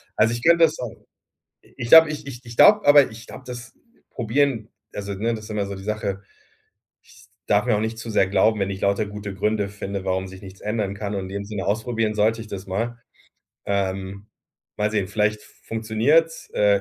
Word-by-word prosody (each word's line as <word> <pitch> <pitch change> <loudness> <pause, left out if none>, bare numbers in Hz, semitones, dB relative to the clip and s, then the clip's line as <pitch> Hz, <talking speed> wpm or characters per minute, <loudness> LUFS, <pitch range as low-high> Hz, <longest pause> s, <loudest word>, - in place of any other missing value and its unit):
also, 110 +2 +3
ich 120 +1 -5
könnte 170 0 +5
das 155 0 -3
auch 125 -3 -4 0.7
ich 120 - -8
glaube 160 +4 +9
ich 150 -2 -6
ich 125 -4 -8
ich 115 -1 -10
glaube, 210 - +6
aber 145 -2 +7
ich 110 +1 -12
glaube, - - -11
das 120 -2 -8 0.4
probieren, 120 -1 0 0.3
also, 100 0 -4
ne, 115 +4 -1
das 110 -1 -7
ist 110 - -11
immer 105 -2 -1
so 100 - -5
die 95 - -9
Sache. 100 -2 -3 0.8
Ich 105 +3 -19 0.2
darf 105 +3 +2
mir 120 -4 +3
auch - - -1
nicht 110 +1 -3
zu 115 0 -6
sehr 100 -3 +3
glauben, 105 +2 +2
wenn 95 0 0
ich 95 0 -5
lauter 100 +2 +1
gute 105 -1 -7
Gründe 105 +1 0
finde, 100 -1 -5
warum 95 0 -1
sich 95 +1 -12
nichts 95 -1 -12
ändern 105 -2 -2
kann, 100 0 -4
und 100 - -2
in - - -7
dem 100 +1 -4
Sinne 100 -2 -5
ausprobieren 110 +1 -1
sollte 110 +2 +2
ich 110 - -8
das 100 -2 -7
mal. 115 +5 -3 0.7
Ähm, 95 0 -2 0.5
mal 105 0 0
sehen, 105 -3 0
vielleicht 105 0 0
funktioniert's. 115 +9 0
Äh, 100 -1 +3
105 Hz, 205 wpm, -23 LUFS, 100-115 Hz, 0.8 s, glaube